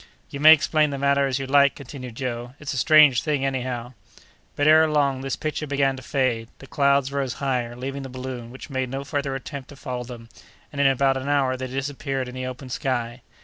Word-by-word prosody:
"You 140 - -6
may 155 +2 +9
explain 155 0 +4
the 140 - -4
matter 140 0 +2
as 130 -1 -1
you 135 - -4
like," 140 +1 +4
continued 130 -3 -9
Joe, 120 0 -5
"it's 150 -2 -5
a - - -4
strange 150 -2 +6
thing, 145 -3 -1
anyhow!" 125 -2 -3 0.6
But 145 - 0
ere 160 +1 +6
long 140 -3 +1
this 135 -1 -2
picture 155 0 -4
began 140 -1 +1
to 130 - -9
fade 125 -4 -1
away; - - -31
the - - -13
clouds 140 -1 +2
rose 140 -3 -2
higher, 125 -4 -2
leaving 135 +3 -5
the 135 - -7
balloon, 130 -2 -7
which 130 +4 -11
made 130 -1 -2
no 135 +2 -4
further 140 -1 -2
attempt 135 0 -7
to 145 - -11
follow 125 -3 -5
them, 120 -1 -10 0.4
and 140 - -2
in 140 - +5
about 135 0 +2
an 130 +2 -4
hour 135 -3 +2
they 130 0 -5
disappeared 135 0 -3
in 125 - -8
the 130 0 -4
open 130 +1 -8
sky. 125 -1 -2
135 Hz, 225 wpm, -24 LUFS, 130-140 Hz, 0.6 s, may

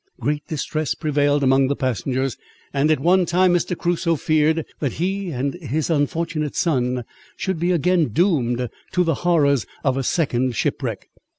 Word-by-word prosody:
Great 150 0 -2
distress 155 -1 -2
prevailed 145 -1 +1
among 135 0 +4
the 140 - 0
passengers; 130 +1 -1 0.4
and 140 +2 +2
at 155 - +3
one 180 +5 +4
time 180 +2 +3
Mr. 175 0 0
Crusoe 170 -1 0
feared, 155 +1 +1
that 140 -5 -1
he 190 +3 -2
and 135 -1 -2
his 155 +3 -2
unfortunate 155 0 -1
son 125 -6 0 0.3
should 190 -4 -2
be 175 +2 0
again 175 -1 +2
doomed 125 - +1 0.3
to 180 - +3
the 165 -2 +1
horrors 145 -7 +2 0.2
of 135 -2 +1
a 135 - -1
second 130 -4 0
shipwreck. - - -2
150 Hz, 160 wpm, -22 LUFS, 135-170 Hz, 0.4 s, among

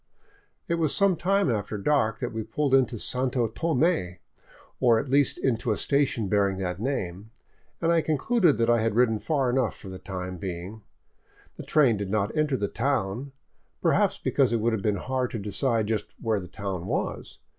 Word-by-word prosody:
It 170 -1 0
was 155 -3 +2
some 200 -2 +3
time 195 -2 +1
after 105 -1 -2
dark 110 -1 +1
that 120 - -3
we 110 - -3
pulled 135 +6 -1
into 130 -3 +3
Santo 125 +1 0
Tome, 130 - 0 0.6
or 120 -3 +4
at 135 - -5
least 140 0 +3
into 120 -3 0
a 105 - 0
station 135 -2 +1
bearing 100 -1 +1
that 90 -1 -3
name, 105 -5 -3 0.5
and 165 0 +1
I 165 -1 +4
concluded 160 - +2
that 115 - +1
I 120 -1 +3
had 110 -1 0
ridden 115 -3 +3
far 135 -4 0
enough 125 -3 0
for 95 - -10
the 95 0 -8
time 90 -1 -6
being. 90 +4 -6 0.7
The - - -8
train 135 -8 +3
did 100 -1 -4
not 105 +3 -1
enter 150 -3 +1
the 100 -2 -1
town, 130 0 -2 0.5
perhaps - - +2
because 135 -4 +1
it 120 - +2
would 115 +1 +1
have 110 - -1
been 105 +1 +1
hard 130 +5 -2
to - - -4
decide 110 +2 0
just 105 -1 -3
where 110 -3 0
the 90 - -8
town 95 -3 -5
was. - - -3
115 Hz, 190 wpm, -26 LUFS, 100-140 Hz, 0.7 s, or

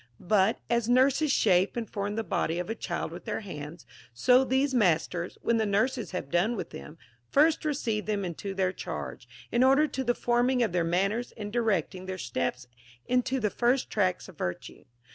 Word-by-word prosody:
But, 205 +3 +3
as 235 -1 0
nurses 270 +4 +4
shape 190 -3 +3
and 230 -2 -2
form 205 +1 -3
the 225 - -1
body 165 -5 -1
of 180 +4 -3
a - - 0
child - - -4
with - - -9
their - - -3
hands, 155 -4 -8 0.3
so 250 - +5
these 265 +1 +1
masters, 175 -5 +1
when 235 - +2
the 220 - +1
nurses 235 +4 0
have 180 -7 -5
done 185 +8 +2
with - - -5
them, 155 0 -10 0.3
first 305 +3 +3
receive 240 -9 -1
them 205 -2 -1
into 195 +3 -5
their 185 -1 +1
charge, - - -6 0.2
in 240 +2 +3
order 270 +4 +5
to 265 -2 -3
the 240 -1 +1
forming 245 +1 +2
of 220 - 0
their 175 -1 +1
manners 195 +8 0
and 205 -1 -6
directing 190 -5 0
their 185 0 -4
steps 120 - -3 0.4
into 250 +1 +1
the 210 -4 0
first 245 +2 +1
tracks 185 -4 0
of 185 -5 -15
virtue. 90 0 -5
215 Hz, 190 wpm, -28 LUFS, 180-245 Hz, 0.4 s, so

